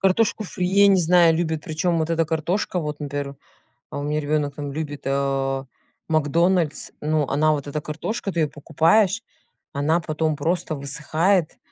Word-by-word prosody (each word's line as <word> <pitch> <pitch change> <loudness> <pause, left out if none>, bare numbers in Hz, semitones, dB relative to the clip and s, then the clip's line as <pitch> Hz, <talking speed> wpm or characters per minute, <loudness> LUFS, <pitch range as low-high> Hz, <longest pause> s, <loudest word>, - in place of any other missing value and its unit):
Картошку 215 +3 +2
фри, 180 -1 -3
я 200 +2 +5
не 195 -2 +5
знаю, 170 -1 +5
любят, 160 -2 -2
причём 165 +2 0
вот 160 +1 -1
эта 165 0 +2
картошка, 170 +4 -1
вот, 150 -1 -5
например, 140 -1 -4 0.5
а, - - -5
у - - -3
меня 150 +1 -1
ребёнок 145 -1 -1
там 145 -1 -5
любит, 145 -1 -5
а, 135 -1 0 0.4
"МакДональдс", 160 +1 +1
ну, 150 -1 +1
она 155 +2 +3
вот 145 -2 -2
эта 150 +1 -3
картошка, 190 +8 -4
ты 170 - -1
её 150 -2 +1
покупаешь, 170 +8 +2 0.5
она 155 +4 +1
потом 155 -1 -1
просто 165 0 -1
высыхает. 155 +5 0
155 Hz, 165 wpm, -23 LUFS, 145-175 Hz, 0.5 s, я